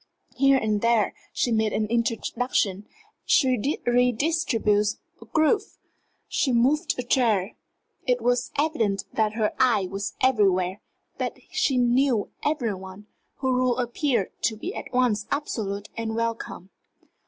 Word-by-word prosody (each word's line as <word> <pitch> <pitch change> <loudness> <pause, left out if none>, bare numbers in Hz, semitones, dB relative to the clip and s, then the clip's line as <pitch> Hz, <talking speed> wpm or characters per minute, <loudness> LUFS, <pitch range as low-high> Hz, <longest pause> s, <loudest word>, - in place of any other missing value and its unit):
Here 275 +1 +4
and 215 -4 0
there 230 -3 +2 0.2
she 245 - 0
made 220 -1 +1
an 215 - +1
introduction, 230 -3 -1 0.4
she 260 +1 +2
redistributed 240 -4 +2 0.3
a - - -11
group, 315 - +2 0.7
she 265 - 0
moved 255 +6 +2
a 250 - -2
chair. 225 -6 +1 0.5
It 250 -1 +2
was 245 +2 +1
evident 230 -10 0
that 215 -1 +1
her 215 -1 0
eye 240 -7 +3
was 200 +1 -4
everywhere, 195 -6 +2 0.4
that - - -2
she 360 -8 +1
knew 245 -2 +2
every 285 -8 0
one; 190 +2 -10 0.4
her 260 - +2
rule 255 -1 +2
appeared 245 - 0
to 220 - +1
be 355 - -5
at - - -7
once 245 -5 +1
absolute 205 -8 -3
and 225 -1 -3
welcome. 230 -4 -4
235 Hz, 130 wpm, -25 LUFS, 210-255 Hz, 0.7 s, Here